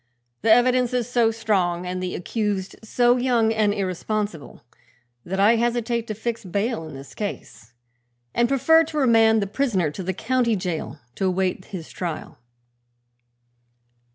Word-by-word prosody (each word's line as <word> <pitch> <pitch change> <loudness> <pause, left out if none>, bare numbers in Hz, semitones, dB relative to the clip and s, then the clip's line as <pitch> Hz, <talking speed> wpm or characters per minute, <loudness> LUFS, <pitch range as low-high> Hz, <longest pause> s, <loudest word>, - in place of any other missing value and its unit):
The 225 - +3
evidence 250 +1 +4
is 240 -2 0
so 240 -2 +3
strong 195 -6 0
and 180 0 -3
the 180 -1 -3
accused 200 -1 -2
so 240 +2 +3
young 240 -3 +2
and 215 -2 +2
irresponsible, 200 - -3 0.6
that 190 +2 -4
I 215 +4 +5
hesitate 235 0 -1
to 215 - -4
fix 230 +2 -4
bail 200 -1 -2
in 155 - -9
this 135 0 -11
case 195 - -7 0.6
and 235 0 +2
prefer 320 +5 +5
to 310 -1 -6
remand 225 -5 +4
the - - -1
prisoner 200 - 0
to 150 - -7
the 185 +1 -2
county 235 +1 +1
jail 180 -5 -4 0.2
to 190 - -2
await 185 0 -1
his 180 -6 -8
trial." 165 -5 -6
215 Hz, 150 wpm, -23 LUFS, 185-235 Hz, 0.6 s, I